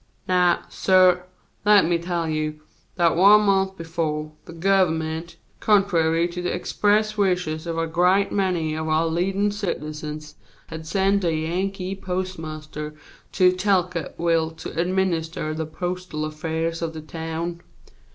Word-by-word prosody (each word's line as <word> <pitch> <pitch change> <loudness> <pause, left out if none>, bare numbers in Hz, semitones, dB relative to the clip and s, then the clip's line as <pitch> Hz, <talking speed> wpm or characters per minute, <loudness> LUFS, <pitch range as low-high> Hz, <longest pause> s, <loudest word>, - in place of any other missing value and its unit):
Now, 180 -1 +3
suh, 185 -1 +4 0.5
let 205 -3 +6
me 170 0 +1
tell 170 -1 -2
you 155 -1 -2 0.3
that 170 -3 +3
one 200 +4 +7
month 195 -2 +1
befo', 155 -2 -3
the - - -10
Government, 165 -2 0 0.2
contrary 170 -5 +3
to 175 +1 -5
the 180 - -1
express 210 +3 +1
wishes 180 -5 0
of 165 -1 -3
a 165 - +1
great 180 +4 +2
many 180 -6 0
of 160 0 -3
our 155 +1 +2
leadin' 190 +5 0
citizens, 155 -6 -5 0.3
had 160 0 -7
sent 195 +3 +2
a 165 -2 +1
Yankee 185 +4 -2
postmaster 155 -5 -5 0.4
to 180 -1 +5
Talcottville 170 -3 0
to - - -7
administer 170 -3 -1
the 160 0 -4
postal 180 -2 -4
affairs 160 +2 -3
of 165 -1 -3
the 160 - -7
town. 165 +2 -5
170 Hz, 130 wpm, -23 LUFS, 160-185 Hz, 0.5 s, one